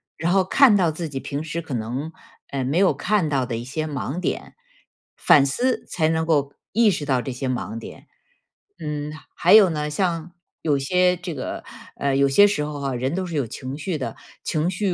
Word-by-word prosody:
然 170 Hz, +3 st, -1 dB
后 190 Hz, -1 st, +4 dB
看 260 Hz, +1 st, +6 dB
到 175 Hz, -4 st, +2 dB
自 160 Hz, 0 st, -5 dB
己 135 Hz, -, -4 dB
平 140 Hz, +3 st, -4 dB
时 165 Hz, +1 st, -4 dB
可 155 Hz, -5 st, -7 dB
能， 125 Hz, +8 st, -3 dB, 0.4 s
呃， 135 Hz, -1 st, -2 dB
没 135 Hz, +6 st, 0 dB
有 190 Hz, -5 st, +4 dB
看 180 Hz, +5 st, +1 dB
到 135 Hz, -4 st, 0 dB
的 115 Hz, -2 st, -3 dB
一 120 Hz, -, -6 dB
些 155 Hz, +4 st, -3 dB
盲 145 Hz, +1 st, -4 dB
点， -, -, -3 dB, 0.6 s
反 140 Hz, -1 st, +5 dB
思 250 Hz, -, 0 dB
才 160 Hz, -3 st, 0 dB
能 160 Hz, 0 st, +1 dB
够 145 Hz, -4 st, +1 dB, 0.2 s
意 225 Hz, +1 st, +4 dB
识 160 Hz, -6 st, -1 dB
到 130 Hz, -3 st, +1 dB
这 130 Hz, -, -5 dB
些 130 Hz, +1 st, -3 dB
盲 120 Hz, -2 st, -3 dB
点。 115 Hz, -, -10 dB, 0.7 s
嗯， 150 Hz, -1 st, -4 dB, 0.2 s
还 175 Hz, -, +4 dB
有 210 Hz, -4 st, +8 dB
呢， 150 Hz, -2 st, -2 dB
像 170 Hz, +1 st, -1 dB, 0.3 s
有 145 Hz, -3 st, +1 dB
些 180 Hz, +5 st, +2 dB
这 180 Hz, -2 st, -6 dB
个 -, -, -5 dB, 0.3 s
呃 140 Hz, -1 st, 0 dB
有 140 Hz, 0 st, +3 dB
些 205 Hz, +9 st, +7 dB
时 200 Hz, -7 st, -1 dB
候 150 Hz, -1 st, -5 dB
啊， 135 Hz, -2 st, -2 dB
人 130 Hz, +4 st, -1 dB
都 185 Hz, +1 st, -2 dB
是 170 Hz, -, -5 dB
有 140 Hz, -4 st, +1 dB
情 130 Hz, +5 st, -6 dB
绪 160 Hz, +2 st, -3 dB
的， 135 Hz, -, -4 dB, 0.3 s
情 160 Hz, +2 st, 0 dB
绪 190 Hz, -1 st, -1 dB
150 Hz, 225 characters per minute, -23 LUFS, 140-180 Hz, 0.7 s, 有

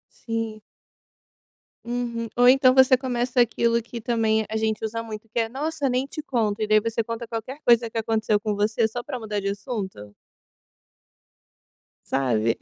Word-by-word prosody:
Sim. 225 Hz, -2 st, -4 dB, 1.2 s
Uhum 235 Hz, -1 st, -3 dB
ou 245 Hz, 0 st, +6 dB
então 260 Hz, 0 st, +6 dB
você 260 Hz, -1 st, +6 dB
começa 250 Hz, -1 st, 0 dB
aquilo 235 Hz, 0 st, +2 dB
que 235 Hz, +1 st, -8 dB
também 220 Hz, -1 st, +1 dB
a 220 Hz, -, -2 dB
gente 220 Hz, 0 st, -1 dB
usa 230 Hz, +1 st, -3 dB
muito, 220 Hz, -1 st, -8 dB
que 230 Hz, -, -4 dB
é: 225 Hz, -1 st, +1 dB
"Nossa, 290 Hz, +3 st, -2 dB
nem 255 Hz, +1 st, 0 dB
te 295 Hz, -, -7 dB
conto!". 220 Hz, -6 st, -1 dB
E 215 Hz, -, +1 dB
daí 215 Hz, 0 st, +4 dB
você 230 Hz, +1 st, -1 dB
conta 230 Hz, +1 st, -5 dB
qualquer 235 Hz, +6 st, -6 dB
coisa 235 Hz, -1 st, +4 dB
que 225 Hz, -, -12 dB
aconteceu 220 Hz, -1 st, +1 dB
com 210 Hz, -1 st, -1 dB
você, 220 Hz, +2 st, +1 dB
só 240 Hz, +2 st, -5 dB
para 265 Hz, -1 st, -5 dB
mudar 215 Hz, -3 st, -3 dB
de 200 Hz, -, -2 dB
assunto. 200 Hz, -, -5 dB, 2.0 s
Sabe? 115 Hz, -4 st, +1 dB
230 Hz, 165 wpm, -24 LUFS, 215-245 Hz, 2.0 s, ou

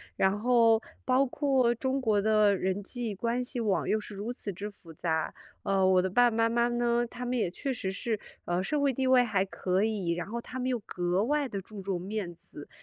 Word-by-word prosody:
然 195 Hz, +2 st, +2 dB
后 230 Hz, -2 st, +5 dB, 0.2 s
包 260 Hz, +2 st, +3 dB
括 265 Hz, -3 st, +2 dB
中 260 Hz, +3 st, -1 dB
国 215 Hz, -5 st, +2 dB
的 215 Hz, -1 st, +4 dB
人 190 Hz, +2 st, -1 dB
际 230 Hz, -1 st, -3 dB
关 235 Hz, +5 st, -1 dB
系 245 Hz, 0 st, -3 dB
网 210 Hz, -4 st, 0 dB
又 215 Hz, -, +2 dB
是 210 Hz, -, -9 dB
如 210 Hz, +5 st, -4 dB
此 205 Hz, -4 st, -5 dB
之 200 Hz, +4 st, -5 dB
复 170 Hz, -5 st, -14 dB
杂， 160 Hz, 0 st, -1 dB, 0.3 s
呃， 195 Hz, -1 st, +1 dB
我 185 Hz, -1 st, +5 dB
的 185 Hz, -, 0 dB
爸 245 Hz, +6 st, +5 dB
爸 230 Hz, -, -4 dB
妈 230 Hz, -, +4 dB
妈 235 Hz, +1 st, +2 dB
呢， 240 Hz, 0 st, +1 dB
他 245 Hz, +1 st, -6 dB
们 250 Hz, +1 st, -1 dB
也 220 Hz, -8 st, +1 dB
确 270 Hz, +9 st, -3 dB
实 190 Hz, -6 st, -3 dB
是， 215 Hz, +2 st, -2 dB, 0.3 s
呃， 175 Hz, +1 st, 0 dB
社 295 Hz, +9 st, 0 dB
会 280 Hz, -2 st, +2 dB
地 260 Hz, +1 st, 0 dB
位 255 Hz, -1 st, +6 dB
还 200 Hz, -5 st, +1 dB
可 190 Hz, 0 st, -1 dB
以， 210 Hz, -6 st, -1 dB
然 175 Hz, +2 st, -3 dB
后 235 Hz, +3 st, -4 dB
他 255 Hz, +2 st, -7 dB
们 255 Hz, -, -1 dB
又 250 Hz, -, +1 dB
格 180 Hz, +2 st, 0 dB
外 285 Hz, +2 st, 0 dB
地 200 Hz, -, -3 dB
注 200 Hz, +1 st, -9 dB
重 190 Hz, -2 st, -2 dB
面 190 Hz, -2 st, -4 dB
子。 145 Hz, -3 st, -11 dB
220 Hz, 250 characters per minute, -29 LUFS, 190-245 Hz, 0.3 s, 位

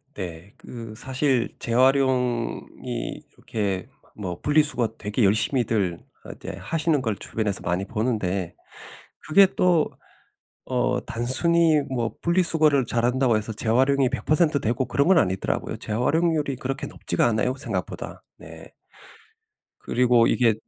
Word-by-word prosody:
네. 90 Hz, 0 st, -7 dB
그 115 Hz, -3 st, -9 dB
사실 130 Hz, 0 st, 0 dB
재활용이 125 Hz, -1 st, 0 dB, 0.2 s
요렇게 100 Hz, -4 st, -3 dB, 0.3 s
뭐 90 Hz, -4 st, -5 dB
분리수거 150 Hz, -6 st, +1 dB
되게 105 Hz, +2 st, 0 dB
열심히들 105 Hz, -3 st, +1 dB, 0.2 s
어 -, -, -11 dB
이제 95 Hz, -, -7 dB
하시는 155 Hz, -, 0 dB
걸 110 Hz, -5 st, -2 dB
주변에서 105 Hz, -2 st, -2 dB
많이 90 Hz, +3 st, -1 dB
보는데 100 Hz, -6 st, -2 dB, 0.7 s
그게 195 Hz, +5 st, +7 dB
또 175 Hz, -4 st, +3 dB, 0.8 s
어 125 Hz, 0 st, +1 dB
단순히 155 Hz, +7 st, +3 dB
뭐 120 Hz, -4 st, -2 dB
분리수거를 160 Hz, -5 st, +3 dB
잘한다고 120 Hz, 0 st, +2 dB
해서 110 Hz, +1 st, -4 dB
재활용이 130 Hz, +4 st, +2 dB
100% 150 Hz, +3 st, +1 dB
되고 120 Hz, +3 st, 0 dB
그런 140 Hz, +3 st, 0 dB
건 190 Hz, -1 st, +5 dB
아니더라고요. 95 Hz, -, -1 dB
재활용률이 145 Hz, +5 st, 0 dB
그렇게 135 Hz, +2 st, -4 dB
높지가 -, -, -1 dB
않아요, 115 Hz, +3 st, 0 dB
생각보다. 135 Hz, -, -5 dB, 0.2 s
네. -, -, -12 dB, 1.1 s
그리고 120 Hz, -1 st, +3 dB
이게 115 Hz, -3 st, +3 dB
125 Hz, 280 characters per minute, -24 LUFS, 110-140 Hz, 1.1 s, 그게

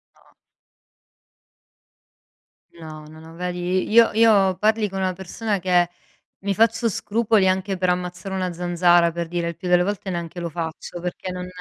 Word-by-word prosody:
No. -, -, -27 dB, 2.4 s
No, 155 Hz, -2 st, -10 dB
no, 155 Hz, +1 st, -13 dB
no 160 Hz, +1 st, -13 dB
vedi, 180 Hz, +1 st, -2 dB
io 230 Hz, +1 st, +6 dB
io 205 Hz, -5 st, +4 dB
parli 215 Hz, +1 st, +1 dB
con 195 Hz, 0 st, -6 dB
una 185 Hz, -1 st, 0 dB
persona 195 Hz, +2 st, -3 dB
che 175 Hz, -1 st, +2 dB, 0.5 s
mi 200 Hz, 0 st, -1 dB
faccio 230 Hz, +2 st, +2 dB
scrupoli 215 Hz, -1 st, +1 dB
anche 190 Hz, +1 st, 0 dB
per 180 Hz, 0 st, -1 dB
ammazzare 180 Hz, +2 st, -3 dB
una 185 Hz, -2 st, -2 dB
zanzara, 175 Hz, -1 st, +3 dB
per 170 Hz, -1 st, -4 dB
dire, 170 Hz, 0 st, -2 dB
il 170 Hz, -, -6 dB
più 180 Hz, -, -6 dB
delle 180 Hz, 0 st, +4 dB
volte 200 Hz, -1 st, -3 dB
neanche 170 Hz, 0 st, -5 dB
lo 170 Hz, -, -3 dB
faccio, 165 Hz, +1 st, -6 dB
perché 180 Hz, +1 st, -5 dB
non 180 Hz, 0 st, -5 dB
180 Hz, 160 wpm, -22 LUFS, 175-195 Hz, 2.4 s, io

